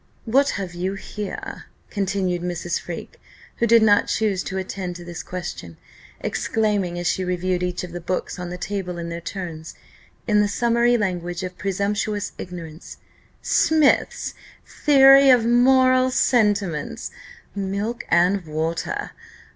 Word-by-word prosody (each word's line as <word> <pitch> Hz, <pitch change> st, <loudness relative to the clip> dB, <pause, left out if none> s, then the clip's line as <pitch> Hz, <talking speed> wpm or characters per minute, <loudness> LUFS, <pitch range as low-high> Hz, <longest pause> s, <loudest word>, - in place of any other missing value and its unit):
"What 275 Hz, +5 st, +3 dB
have 185 Hz, -3 st, -5 dB
you 185 Hz, +3 st, -3 dB
here?" 205 Hz, +1 st, -7 dB, 0.3 s
continued 190 Hz, -3 st, -1 dB
Mrs. 175 Hz, -1 st, -2 dB
Freke, 170 Hz, -2 st, -8 dB, 0.4 s
who 235 Hz, -, +1 dB
did 230 Hz, 0 st, +6 dB
not 205 Hz, -2 st, +4 dB
choose 210 Hz, -4 st, 0 dB
to 190 Hz, -, -4 dB
attend 185 Hz, -1 st, -4 dB
to 175 Hz, 0 st, -9 dB
this 175 Hz, -1 st, -6 dB
question; 130 Hz, -, -7 dB, 0.4 s
exclaiming, 205 Hz, -5 st, -1 dB
as 175 Hz, -, -4 dB
she 175 Hz, +2 st, 0 dB
reviewed 180 Hz, 0 st, -1 dB
each 180 Hz, 0 st, -2 dB
of 180 Hz, -, -7 dB
the 175 Hz, 0 st, -6 dB
books 185 Hz, +2 st, -3 dB
on 180 Hz, -1 st, -5 dB
the 180 Hz, -, -5 dB
table 185 Hz, -2 st, -4 dB
in 170 Hz, 0 st, -5 dB
their 170 Hz, 0 st, -5 dB
turns, 170 Hz, -4 st, -7 dB, 0.5 s
in 210 Hz, -2 st, +3 dB
the 205 Hz, -, +2 dB
summary 235 Hz, +2 st, +2 dB
language 175 Hz, -4 st, -2 dB
of 180 Hz, 0 st, -5 dB
presumptuous 205 Hz, +2 st, -2 dB
ignorance, 165 Hz, -2 st, -8 dB, 0.5 s
"Smith's 310 Hz, -3 st, +2 dB, 0.3 s
Theory 275 Hz, -1 st, +6 dB
of 245 Hz, -3 st, +5 dB
Moral 255 Hz, +1 st, +4 dB
Sentiments 205 Hz, -, +1 dB, 0.4 s
milk 200 Hz, +4 st, -3 dB
and 180 Hz, +2 st, +3 dB
water! 160 Hz, +2 st, -3 dB
190 Hz, 140 wpm, -22 LUFS, 175-220 Hz, 0.5 s, did